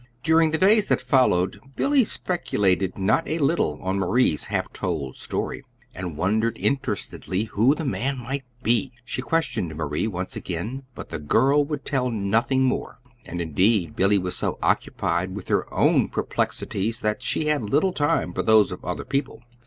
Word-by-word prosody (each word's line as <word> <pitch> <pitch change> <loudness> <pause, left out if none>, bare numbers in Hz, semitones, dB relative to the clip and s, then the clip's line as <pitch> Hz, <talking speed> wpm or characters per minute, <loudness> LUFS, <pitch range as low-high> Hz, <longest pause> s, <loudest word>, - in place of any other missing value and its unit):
During 160 0 +4
the 160 - 0
days 205 +4 +4
that - - +2
followed, 125 -8 +2 0.2
Billy 280 -2 +3
speculated 100 - 0
not 105 +12 +1
a 160 - -1
little 140 - +1
on 95 +1 -1
Marie's 95 -4 +2
half - - -2
told 70 -4 -3
story, - - -4 0.3
and 90 -4 -6
wondered 110 +5 +1
interestedly 110 -7 -1
who 115 +5 +2
the 160 - -4
man 135 +1 -1
might 135 +3 -4 0.2
be. 120 +3 +1
She 130 - -3
questioned 125 - -1
Marie 75 +4 -2
once 90 -3 -4
again, 110 +10 -5
but - - -8
the 80 - -4
girl 135 - +3
would 145 -1 -5
tell 130 -3 0
nothing 115 +5 +1
more; 130 - -1 0.3
and, 85 - -5
indeed, 85 +2 +1
Billy 100 +2 +4
was 90 -1 -2
so - - -2
occupied 90 +3 0
with 100 - -8
her - - 0
own - - +3
perplexities 115 +4 -2
that 105 +3 -1
she 150 - 0
had 150 -2 +1
little 150 - +1
time 145 - 0
for 95 - -1
those 110 +2 +4
of - - -7
other - - -4
people. 135 -3 -3
115 Hz, 170 wpm, -24 LUFS, 95-140 Hz, 0.3 s, During